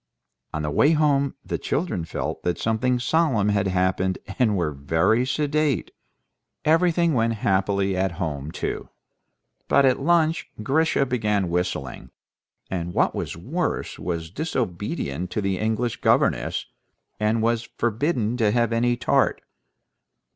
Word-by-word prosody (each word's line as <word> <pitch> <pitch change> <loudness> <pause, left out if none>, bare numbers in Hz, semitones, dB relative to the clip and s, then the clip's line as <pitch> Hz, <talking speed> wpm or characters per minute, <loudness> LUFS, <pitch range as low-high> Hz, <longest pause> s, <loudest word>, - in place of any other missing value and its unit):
On 75 - -3
the 75 - -1
way 145 - +4
home 140 -3 +2
the - - -3
children 125 - -2
felt - - -4
that 90 - -1
something 120 +3 +1
solemn 125 -5 +2
had 100 -1 +1
happened, 95 0 +1 0.2
and 110 -5 +3
were 85 -4 0
very 80 - +1
sedate. 150 -1 0 0.7
Everything 165 +1 +3
went 115 -2 +2
happily 95 0 +1
at 95 -1 0
home 75 -4 -4
too; - - -4 0.8
but 140 - +4
at 130 0 +3
lunch 165 +2 +2
Grisha 150 +3 +2
began 105 -7 0
whistling, 85 -7 -3 0.6
and, 90 -2 -4
what - - +2
was - - -4
worse, - - -3
was 85 -2 -4
disobedient 100 - -3
to - - -2
the 95 -2 -1
English 110 +2 -1
governess, - - +2 0.5
and 110 +1 +1
was 115 0 0
forbidden 120 0 0
to 110 -4 +3
have 115 +1 +1
any 120 +1 +2
tart. 125 - +1
110 Hz, 135 wpm, -24 LUFS, 95-135 Hz, 0.8 s, way